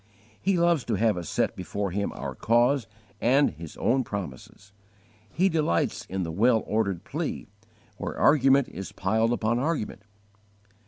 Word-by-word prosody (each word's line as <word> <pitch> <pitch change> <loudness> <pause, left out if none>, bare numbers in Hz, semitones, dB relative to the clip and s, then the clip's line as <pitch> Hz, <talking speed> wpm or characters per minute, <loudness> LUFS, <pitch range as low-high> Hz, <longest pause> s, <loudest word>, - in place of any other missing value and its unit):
He 195 -1 +2
loves 170 -5 +3
to 115 - 0
have 110 +1 +2
us 85 -3 -5
set - - 0
before 100 -2 -3
Him 100 +2 -1
our 70 -1 -5
cause 120 - +2 0.3
and 135 +5 +4
His 80 0 -10
own 130 +2 +2
promises: 100 - -7 0.6
He 180 - +2
delights 155 - 0
in 95 0 -3
the 80 - -4
well 110 +6 +3
ordered 100 -5 -1
plea, - - -4 0.5
where - - -5
argument 135 -2 +4
is 95 - -7
piled 110 +4 +1
upon 120 0 0
argument. 140 -8 -2
110 Hz, 150 wpm, -26 LUFS, 95-135 Hz, 0.6 s, and